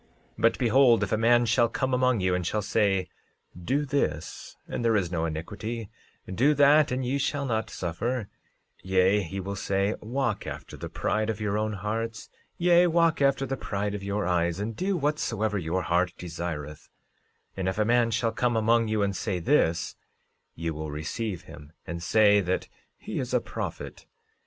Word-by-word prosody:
13:27 - - -7
But 115 0 +4
behold, 120 0 +4
if - - -3
a - - +3
man 120 +2 +4
shall 115 +1 +3
come 130 -1 -1
among 125 -4 +2
you 90 0 +1
and 90 0 0
shall 105 +4 -1
say: 95 -3 +1 0.6
Do 145 +6 +1
this, 80 - -3
and - - -4
there 115 -1 +3
is 90 -4 0
no 85 -2 -1
iniquity; 105 +8 -5 0.3
do 130 +11 +2
that 145 +1 +5
and 130 0 -1
ye 135 +3 0
shall 140 0 -1
not 110 -4 -1
suffer; 105 +7 -3 0.5
yea, 95 +2 +3
he 95 +1 -5
will 100 +1 -4
say: 100 +1 0
Walk 120 -1 -2
after - - -7
the - - -7
pride 110 0 -1
of 110 -1 -2
your 105 -1 -1
own 110 0 -1
hearts; 110 +3 -4 0.3
yea, 175 0 +5
walk 165 -2 +2
after 140 0 +3
the 135 0 -2
pride 100 -2 -3
of 105 - -4
your 100 0 -2
eyes, 85 0 +1
and 110 +2 -3
do 190 - -1
whatsoever 115 -9 -1
your 90 +2 -1
heart 90 +1 +1
desireth—and 85 +2 -7
if 95 - -4
a 105 - +2
man 120 0 +3
shall 115 +1 0
come 120 +1 0
among 115 +1 +3
you 110 -1 +1
and 100 -1 -1
say 95 -2 -2
this, 85 - +1 0.6
ye 85 0 -3
will 80 0 -5
receive 85 +6 -4
him, 75 -3 -13
and 85 0 -5
say 105 +3 +4
that 95 0 -2 0.3
he - - -5
is - - -2
a - - +5
prophet. - - -6
105 Hz, 180 wpm, -27 LUFS, 90-120 Hz, 0.6 s, that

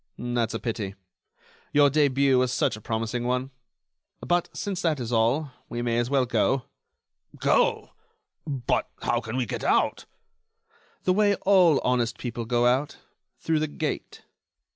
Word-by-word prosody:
"That's 120 -2 -2
a - - -2
pity. 105 -5 -4 0.8
Your 145 -1 +5
début 140 -2 +3
was 125 -1 +1
such - - +1
a 105 - -11
promising 115 +2 -2
one. 125 +2 -1 0.7
But, 175 0 +1
since 195 -3 -4
that 160 -5 +1
is 120 -1 -4
all, 125 +6 +1 0.2
we 120 0 -3
may 120 -1 +1
as 120 0 -1
well 135 -2 +2
go." 125 +1 +1 0.7
"Go! - - +2 0.6
but 135 -5 -1
how 120 0 +1
can 110 +2 -5
we 130 - 0
get - - -5
out?" - - +1 1.0
"The 185 - +3
way 205 +1 +3
all 180 -7 +5
honest 120 -2 0
people 120 -1 -5
go 120 +1 +1
out: 130 +4 +1 0.4
through 160 -1 0
the 155 - 0
gate." 145 - -5
125 Hz, 150 wpm, -26 LUFS, 120-145 Hz, 1.0 s, Your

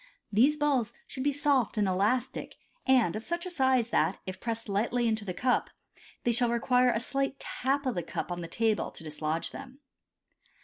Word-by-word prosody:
These 270 +9 +4
balls 270 -6 +1
should 260 - -7
be 285 +2 +2
soft 280 -5 +1
and 205 -2 +2
elastic, 200 +7 0 0.3
and 245 -9 +4
of 215 - -4
such 345 +4 -2
a 365 - -2
size 260 -7 +2
that, - - +2
if 185 -1 -6
pressed 230 -1 -2
lightly 230 +4 +1
into 220 -1 0
the 185 - -3
cup, 250 +5 +1 0.5
they 240 - +2
shall 240 +1 +3
require 250 +2 +3
a 225 - +1
slight 275 +3 -1
tap 275 +2 -1
of 255 - +1
the 175 - -2
cup 175 - -5
on 175 0 -3
the 170 - -5
table 220 +2 0
to - - -12
dislodge 155 +1 -3
them. 270 -1 -10
240 Hz, 190 wpm, -29 LUFS, 210-265 Hz, 0.5 s, These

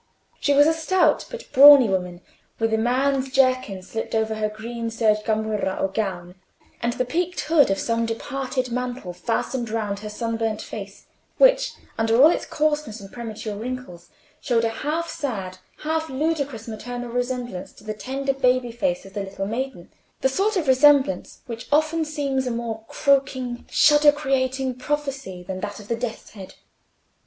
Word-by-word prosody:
She 285 - +2
was 290 +1 +7
a 320 - +4
stout 325 +4 +2
but 485 -1 -8
brawny 280 -2 +10
woman, 180 -2 -2 0.4
with 225 0 0
a - - +3
man's 265 +3 +1
jerkin 255 -8 +2
slipped 225 +4 -4
over 220 0 +1
her 215 -1 -1
green 230 +2 -5
serge 220 -2 +2
gamurra 215 -3 -1
or 195 - 0
gown, 185 -4 -3 0.5
and 235 0 0
the 255 - -1
peaked 350 +7 -1
hood 305 -5 +4
of 195 - +1
some 230 +1 0
departed 255 +2 -3
mantle 250 -6 -4
fastened 230 +6 -2
round 210 -2 -2
her 210 0 -7
sunburnt 225 0 -2
face, 200 -2 -8 0.3
which, - - +5 0.3
under 225 +1 +2
all 305 +5 +8
its - - -2
coarseness 300 -7 -1
and 195 -1 -12
premature 220 -3 -6
wrinkles, 225 -6 -7 0.3
showed 230 -4 +1
a - - +2
half 305 +8 -2
sad, 200 - -4 0.2
half 320 +1 -1
ludicrous 280 -5 -2
maternal 245 +2 -6
resemblance 245 -5 -3
to - - -18
the 215 0 -4
tender 270 +6 -2
baby 255 -2 +1
face 265 +2 -1
of 195 - -13
the 205 - -3
little 195 0 -5
maiden—the 250 +2 -4
sort 395 +9 +1
of 325 -5 -1
resemblance 280 +1 +4
which 235 -2 -7
often 310 +2 +2
seems 275 -4 -1
a - - 0
more 230 -2 -4
croaking, 260 -3 0
shudder 295 0 +6
creating 265 -2 -1
prophecy 270 -8 -4
than 185 +1 -5
that 205 +1 -5
of 205 - -12
the 230 - +1
death's 230 -1 -5
head. 195 -3 -11
245 Hz, 165 wpm, -23 LUFS, 220-275 Hz, 0.5 s, brawny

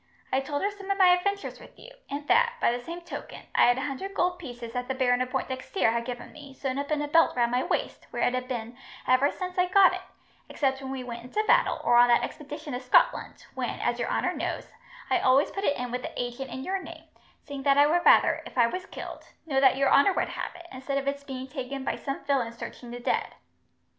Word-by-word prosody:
I 265 - +4
told 285 +3 -3
her 405 - +1
some 400 -1 -11
of 395 - +1
my 375 -2 +6
adventures 400 +3 0
with - - -15
you, - - -13 0.2
and 285 +1 -5
that, 475 0 +4
by - - +3
the 245 0 -4
same 340 +4 -7
token, 345 - -8
I - - +5
had 245 +1 +4
a - - -2
hundred 335 +8 -5
gold 360 -1 +1
pieces 245 -6 -8
that 250 0 -3
the 265 - -2
Baron 250 -1 +2
of 255 - -1
Pointdexter 260 - -1
had 235 0 -1
given 245 -1 -6
me, 280 -3 -12
sewn 265 0 -3
up 285 - -4
in 300 -1 0
a - - -3
belt 330 +3 +4
round 235 -1 +2
my 250 +1 +2
waist, - - -3
where - - -2
it 245 - +2
has 255 0 -2
been 240 -2 -5 0.3
ever 255 +3 +4
since 365 -1 -5
I 360 - +4
got 375 0 +6
it, 370 - -4 0.5
except 270 -2 0
when 265 - -6
we 265 -1 -4
went 235 -1 -6
into 420 +12 -1
battle, 485 +4 +3
or 240 - +4
on 240 0 +7
that 240 -1 +4
expedition 295 0 -6
to 245 - -2
Scotland, 255 - +2
when, - - -3
as - - -1
your - - -1
honour - - 0
knows, - - -4 0.4
I - - +4
always 265 +3 +3
put 395 0 -3
it 285 - +2
in 245 -1 -4
with 250 +1 -2
the - - -7
agent 245 +2 -4
in 260 +2 -6
your 380 +3 -2
name, - - -10 0.4
seeing 285 -2 -7
that 275 0 +3
I 285 - +7
would 345 +4 +2
rather, - - +5
if - - -13
I 240 - +6
was 365 +11 -4
killed, - - -8 0.2
know 275 -4 +1
that 265 -1 +5
your 275 0 +2
honour 285 +8 +6
would - - -1
have - - -5
it, 345 -1 -12
instead 265 +2 -3
of 275 0 -3
its 280 0 -2
being 265 -2 -6
taken 265 0 -5
by - - -1
some 275 0 -5
villain 260 -5 0
searching 240 +1 -9
the 240 +1 -7
dead. 240 - -1
275 Hz, 255 wpm, -27 LUFS, 250-340 Hz, 0.5 s, on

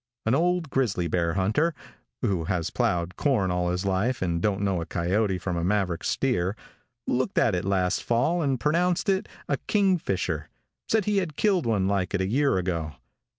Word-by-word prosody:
An 110 - +2
old 170 0 +1
grizzly 105 -10 0
bear 85 0 0
hunter 110 - +1 0.5
who 90 -5 0
has 90 -3 -1
plowed 85 0 0
corn 115 -11 +1
all 90 0 0
his 90 +2 -2
life 100 +5 0
and 85 -2 -1
don't 100 -1 0
know 95 -4 0
a - - -4
coyote 95 +3 0
from 90 0 -3
a 85 - -1
Maverick 95 -3 0
steer 105 -8 0 0.5
looked 130 +1 -1
at 105 - +4
it 90 0 -1
last 95 -2 +1
fall 130 +9 +1
and 135 -5 0
pronounced 175 - +1
it 195 +2 0 0.2
a - - 0
"kingfisher," 125 - 0 0.4
said 220 -3 +2
he 210 -1 +1
had 170 -6 -4
killed 190 - +2
one 100 -4 +1
like 100 -1 0
it 95 - 0
a - - +1
year 135 +3 +2
ago. 85 -4 -2
100 Hz, 185 wpm, -26 LUFS, 90-140 Hz, 0.5 s, at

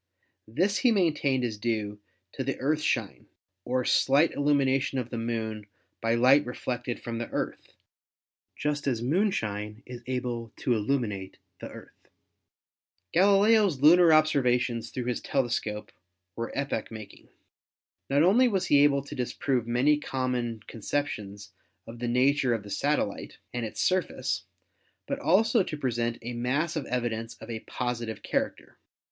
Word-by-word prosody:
This 180 - +1
he 250 - +4
maintained 150 - +1
is 110 -3 -3
due 105 -2 -2 0.3
to 135 - -4
the 135 0 -3
earthshine 150 +3 -1 0.4
or 125 0 0
slight 145 +4 +4
illumination 140 -2 +1
of 125 -2 -3
the 120 - -3
Moon 110 -2 -3 0.3
by 115 +1 +2
light 130 +5 +5
reflected 125 -1 -4
from 115 -1 -5
the 120 - -4
Earth, - - -4 0.8
just 150 -1 -2
as 120 -4 0
moonshine 110 - -1
is 125 -1 -9
able 120 -3 -3
to 125 - 0
illuminate 105 -4 -2 0.2
the - - -7
Earth. - - -14 1.1
Galileo's 200 -3 +4
lunar 170 +3 +7
observations 125 -6 +2
through 125 - -4
his 125 -1 -2
telescope 120 -5 -2 0.4
were 115 0 -4
epoch 135 -5 -2
making. 110 -2 -11 0.8
Not 140 +2 +4
only 225 +9 +5
was 190 -5 0
he 145 0 +5
able 140 -1 +3
to 140 - -9
disprove 125 -1 -1
many 135 +5 +3
common 125 -5 -2
conceptions 105 -5 -4 0.3
of 115 +1 -10
the 120 - -2
nature 130 +1 +3
of 110 - -5
the 100 - -10
satellite - - -1 0.2
and 120 -2 -2
its - - -9
surface, 185 0 0 0.6
but 275 - -3
also 225 -5 +3
to 155 -4 -3
present 120 -4 -1
a 120 +1 -4
mass 135 +8 -1
of 150 -4 -3
evidence 115 -2 -2
of 110 +1 -10
a 110 - -4
positive 120 -2 -4
character. - - -3
125 Hz, 140 wpm, -28 LUFS, 115-145 Hz, 1.1 s, lunar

